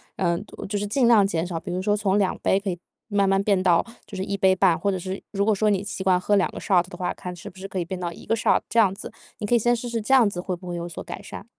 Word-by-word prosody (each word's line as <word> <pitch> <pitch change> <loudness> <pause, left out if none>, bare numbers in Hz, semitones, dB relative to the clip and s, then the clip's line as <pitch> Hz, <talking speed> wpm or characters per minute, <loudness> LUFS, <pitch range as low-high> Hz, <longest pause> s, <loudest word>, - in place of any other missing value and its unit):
嗯， 170 -2 0 0.3
就 205 0 -1
是 205 - -2
尽 245 +4 +2
量 220 -4 +6
减 165 -3 -1
少， 175 -2 -4
比 180 - -9
如 180 +1 -2
说 205 +2 +1
从 205 -1 +1
2 195 -2 +1
杯 190 - +2
可 200 0 -4
以 175 -2 -4 0.3
慢 200 -2 +2
慢 195 0 +3
变 200 -3 +2
到 175 -3 +3 0.2
就 - - -9
是 190 - -2
1 200 +1 -2
杯 190 -1 +4
半， 185 -3 +3
或 200 - 0
者 190 - -1
是 185 +2 -5
如 200 -1 0
果 220 - +3
说 210 +1 +2
你 200 -2 +1
习 195 -1 -5
惯 185 -1 +3
喝 205 +3 +1
两 190 - +2
个 - - -7
shot 180 -2 +2
的 - - -9
话， 180 - -2
看 180 -1 -7
是 - - -9
不 185 - -19
是 195 +1 -7
可 195 - -6
以 170 - -2
变 185 +1 -5
到 175 -1 -3
一 - - -12
个 225 - +1
shot 225 - +2
这 230 - +2
样 195 -4 +4
子。 205 - -8 0.3
你 210 - -4
可 205 - 0
以 - - +4
先 240 +2 +3
试 240 +1 -5
试 235 -1 -2
这 215 - -4
样 255 -5 +6
子 175 -3 -5
会 185 -1 -3
不 180 +1 -12
会 175 - -4
有 170 0 -4
所 170 - -7
改 - - -7
善。 - - -9
195 Hz, 380 characters per minute, -24 LUFS, 180-205 Hz, 0.3 s, 量